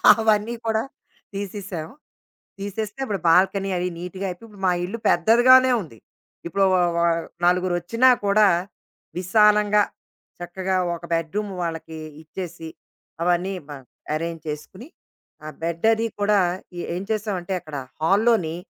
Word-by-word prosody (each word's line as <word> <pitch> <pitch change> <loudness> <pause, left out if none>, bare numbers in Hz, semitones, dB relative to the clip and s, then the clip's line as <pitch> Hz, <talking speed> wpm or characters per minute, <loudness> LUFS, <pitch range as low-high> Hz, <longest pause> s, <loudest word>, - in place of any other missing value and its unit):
అవన్నీ 220 +1 +1
కూడా 220 0 +1 0.5
తీసేసాం. 195 -4 -5 0.7
తీసేస్తే 210 +3 -5
ఇప్పుడు 205 -5 -3
బాల్కనీ 195 +3 +3
అవి 180 +1 -1
నీట్‌గా 180 +2 -5
అయిపోయి, 180 +5 -9
ఇప్పుడు 200 -2 -13
మా - - +4
ఇల్లు 200 +6 -5
పెద్దదిగానే 255 +3 +6
ఉంది. 150 - -12 0.5
ఇప్పుడో 195 +3 +2
వ - - +4 0.2
వ - - +2 0.4
నలుగురొచ్చినా 180 +7 +3 0.2
కూడా, 205 +1 +5 0.7
విశాలంగా 210 +2 +4 0.6
చక్కగా 185 +2 -2 0.2
ఒక 170 - -11
బెడ్‌రూము 190 +5 -2
వాళ్ళకి 165 -1 -5 0.3
ఇచ్చేసి, 165 0 -7 0.5
అవన్నీ 180 +2 +1 0.2
బా 145 - -6 0.4
ఎరేంజ్ 165 0 -4
చేసుకొని, 185 - -8 0.6
ఆ - - -6 0.2
బెడ్డది 220 +8 +1
కూడా 205 0 +3 0.4
ఏ - - -3
ఏం 180 - -3
చేసామంటే, 200 -4 -2
అక్కడ 155 -2 -9 0.3
హాల్‌లోని 195 -2 +3
195 Hz, 120 wpm, -23 LUFS, 175-210 Hz, 0.7 s, పెద్దదిగానే